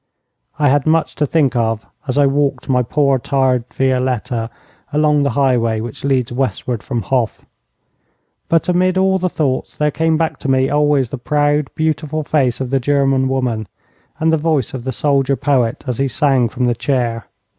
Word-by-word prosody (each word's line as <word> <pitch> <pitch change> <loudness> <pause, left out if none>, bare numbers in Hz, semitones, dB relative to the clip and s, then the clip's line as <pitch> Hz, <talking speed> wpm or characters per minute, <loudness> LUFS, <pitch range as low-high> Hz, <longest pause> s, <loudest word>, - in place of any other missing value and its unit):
I 145 -2 +3
had 145 +2 +2
much 160 0 +2
to 150 - +1
think 140 -3 +1
of 115 -2 0 0.2
as 130 - -2
I 145 - +5
walked 140 0 0
my 125 -2 +2
poor, 140 +2 +1
tired 130 -2 +1
Violette 130 -2 0 0.6
along 150 0 +2
the 140 - +1
highway 120 -5 +2
which 115 0 -7
leads 130 -4 0
westward 125 -2 -2
from 120 -5 -3
Hof. 120 +1 -1 1.0
But 165 -1 +2
amid 180 +1 +2
all 190 0 +2
the 185 0 0
thoughts 140 -6 -2
there 150 0 +1
came 160 +1 +1
back 165 0 -1
to 140 - -4
me 130 0 +2
always 145 -4 +2
the 140 - -5
proud, 145 +1 +1
beautiful 155 -1 -1
face 135 -5 0
of 130 -1 -4
the 135 - +2
German 135 0 +1
woman, 125 -5 -1 0.5
and 160 0 +2
the - - +4
voice 150 -5 0
of 130 -2 -6
the 130 - -1
soldier 140 +2 +1
poet 130 -5 0
as 125 -2 -3
he 135 - +2
sang 130 -2 +1
from 125 +1 -2
the 120 - +2
chair. 120 -2 -2
135 Hz, 180 wpm, -17 LUFS, 125-150 Hz, 1.0 s, I